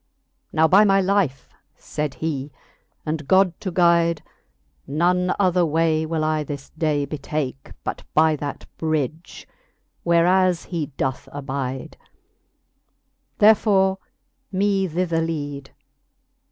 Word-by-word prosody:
Now 160 +1 +4
by 195 +5 +6
my 195 -2 +4
life, 190 -8 0 0.3
fayd 150 -2 -4
he, 145 -3 -3 0.5
and 155 -2 -3
God 185 0 +4
to 195 - -3
guide, 170 -2 +3 0.6
None 180 +5 +1
other 185 -3 +3
way 160 0 +1
will 160 -1 -1
I 155 0 0
this 140 -2 -7
day 155 -3 0
betake, 140 -2 -5
But - - -4
by 155 0 +4
that 145 0 -6
bridge, 155 +1 -3 0.5
whereas 175 +1 +3
he 165 -5 -3
doth 135 +1 -2
abide: 135 -2 -5 1.4
Therefore 200 -3 +4 0.5
me 195 0 +1
thither 170 -1 -1
lead. 145 -4 -4
160 Hz, 110 wpm, -22 LUFS, 145-180 Hz, 1.4 s, by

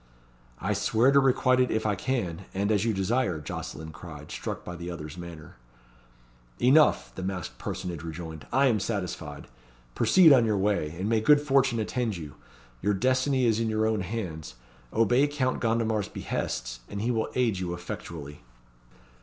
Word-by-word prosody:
"I 105 - -1
swear 110 +5 +3
to 140 - +6
requite 130 -1 +3
it 125 - +3
if 110 0 -1
I 105 - +2
can 95 -6 -2
and 100 +2 +1
as 105 0 +2
you 115 - +2
desire," 95 -3 0
Jocelyn 80 +2 -6
cried, 75 0 -10
struck - - -5
by 90 - -6
the 85 +1 -6
other's 75 -3 -7
manner. 85 -5 -10 1.0
"Enough!" 145 +5 +4
the - - -7
masked 95 -2 -4
personage 90 -5 -4
rejoined. 80 -1 -7
"I 135 +3 +4
am 115 -5 +3
satisfied. 90 -9 -4 0.5
Proceed 155 - +6
on 125 -3 +6
your 110 -2 +1
way, 100 -6 +1
and 95 +3 -2
may 110 -1 +2
good 150 +5 +6
fortune 135 -4 +2
attend 110 -2 -1
you! 75 -4 -8 0.5
Your 105 +1 +1
destiny 130 +4 +2
is 115 -1 +2
in 115 -1 0
your 110 0 +1
own 110 -2 +1
hands. 90 - -5 0.4
Obey 120 +6 +3
Count 140 -3 -1
Gondomar's 110 -3 0
behests, - - -4
and 100 - -5
he 120 - +1
will 110 -2 -1
aid 115 -7 +1
you 90 -1 -3
effectually." 80 -4 -7
105 Hz, 170 wpm, -27 LUFS, 85-120 Hz, 1.0 s, to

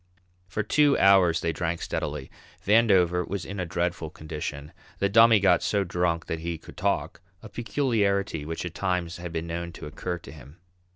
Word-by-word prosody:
For 100 +4 -2
two 145 +6 +3
hours 95 -4 +5
they 85 -1 -1
drank 85 +1 -2
steadily. 70 -2 -4 0.3
Vandover 95 -5 +4
was 100 -2 -4
in 100 0 -6
a 90 - -2
dreadful 85 -1 -2
condition; 75 -1 -7 0.2
the 100 - +1
Dummy 115 +1 +6
got 90 -3 +4
so 100 -1 +1
drunk 85 -2 -1
that 80 - -3
he 85 0 -4
could - - -14
talk, - - -1 0.2
a 110 - -9
peculiarity 105 - 0
which 80 +3 -5
at 85 - -5
times 90 -3 -2
had 85 -1 -7
been 80 0 -3
known 85 +1 -4
to - - -9
occur 90 +4 -4
to 85 - -12
him. 75 0 -14
90 Hz, 180 wpm, -26 LUFS, 80-100 Hz, 0.3 s, Dummy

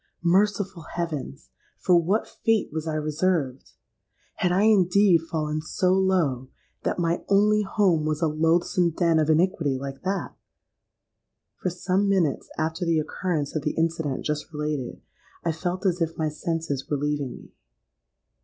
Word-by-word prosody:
Merciful 195 0 +1
heavens! 155 - -4 0.3
for 180 - +3
what 180 +6 +2
fate 225 -8 0
was 160 0 -3
I 155 - -1
reserved? 155 -3 -1 0.6
Had 180 - +1
I 190 +3 +3
indeed 200 -3 +5
fallen 155 -2 -2
so 180 +4 +1
low 175 -10 +1 0.3
that - - -1
my 170 -1 0
only 210 +1 +4
home 190 -5 +2
was 155 -1 -1
a 165 - +2
loathsome 165 +2 +1
den 165 -2 +3
of 155 0 +1
iniquity 160 -4 +2
like 135 0 -7
that? 195 +1 -2 1.3
For 185 - 0
some 185 +3 0
minutes 175 -8 +1
after 160 +3 -1
the 165 -2 +2
occurrence 155 -1 -2
of 155 - 0
the 150 +1 -2
incident 160 -4 -1
just 150 +1 -3
related, 150 -4 -4 0.4
I 165 - +2
felt 180 +4 -3
as 180 -2 +1
if 165 0 -1
my 155 -1 0
senses 150 -3 -3
were 145 - 0
leaving 145 -2 -2
me. - - -14
165 Hz, 150 wpm, -25 LUFS, 150-185 Hz, 1.3 s, indeed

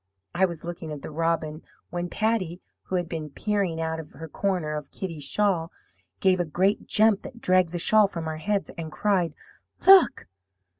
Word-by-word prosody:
I 190 +2 +3
was 170 -3 -8
looking 170 -2 -6
at 150 -2 -7
the - - -6
robin, 160 -1 -1 0.3
when 175 0 -3
Patty, 200 -5 -1 0.3
who 190 - -3
had 175 -1 0
been 160 -2 -5
peering 195 +1 -1
out 160 0 -2
of 155 -2 -10
her 160 - -8
corner 175 -3 -1
of 150 -1 -6
Kitty's 165 -6 -5
shawl, 175 0 +1 0.5
gave 185 -1 +3
a - - +2
great 185 +6 0
jump 215 -1 +4
that 235 - -10
dragged 185 -4 +3
the 175 - -3
shawl 210 +4 +4
from 170 -4 -5
our 155 0 -3
heads, 200 +5 -1
and 160 -1 -5
cried: 180 -3 0 0.5
"'Look!' 385 -1 +7
175 Hz, 185 wpm, -26 LUFS, 160-195 Hz, 0.5 s, Look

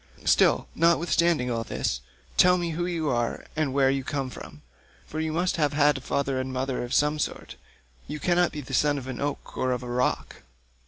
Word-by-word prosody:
Still, - - +4
notwithstanding 170 -4 +2
all 115 -1 -1
this, - - -2 0.3
tell 180 0 +6
me 170 -1 -2
who 175 +2 -2
you 165 -4 -1
are 120 -2 -1
and 155 -3 0
where 135 0 +3
you 135 0 -1
come 135 -2 -3
from—for 65 - -11
you 160 0 -1
must 175 +3 0
have 150 -3 +1
had 145 -2 +3
father 135 0 -1
and 130 0 -3
mother 130 0 -2
of 120 - -6
some 150 +2 +2
sort; - - -4 0.5
you 150 +1 -5
cannot 175 +1 +2
be 150 - -5
the 135 0 -9
son 145 +2 +3
of 135 - -6
an 130 -2 -5
oak 145 0 -4
or 130 - 0
of 125 0 -2
a - - -6
rock." 125 +1 -1
145 Hz, 200 wpm, -26 LUFS, 130-160 Hz, 0.5 s, tell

